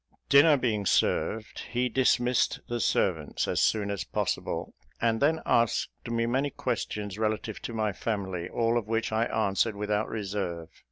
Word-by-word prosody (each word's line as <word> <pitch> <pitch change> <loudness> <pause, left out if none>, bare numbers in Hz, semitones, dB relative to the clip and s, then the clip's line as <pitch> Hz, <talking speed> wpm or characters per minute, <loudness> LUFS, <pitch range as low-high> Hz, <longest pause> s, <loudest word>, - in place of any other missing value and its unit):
Dinner 145 +2 +7
being 110 -6 0
served, 110 0 +1
he 125 +1 0
dismissed 125 0 +2
the 120 0 -2
servants - - 0
as - - +1
soon 105 -2 +2
as 100 -3 -2
possible, - - -2 0.3
and 115 0 +1
then 160 +3 +3
asked 115 -2 +2 0.2
me 115 0 0
many 135 +4 0
questions 105 -6 -3
relative 110 0 -2
to 115 - -5
my 110 -2 0
family, 95 -4 -3
all 115 0 +1
of 110 - -9
which 115 0 -1
I 110 +1 +2
answered 110 -1 0
without 105 +1 -1
reserve. 95 -6 -4
110 Hz, 155 wpm, -28 LUFS, 105-120 Hz, 0.3 s, Dinner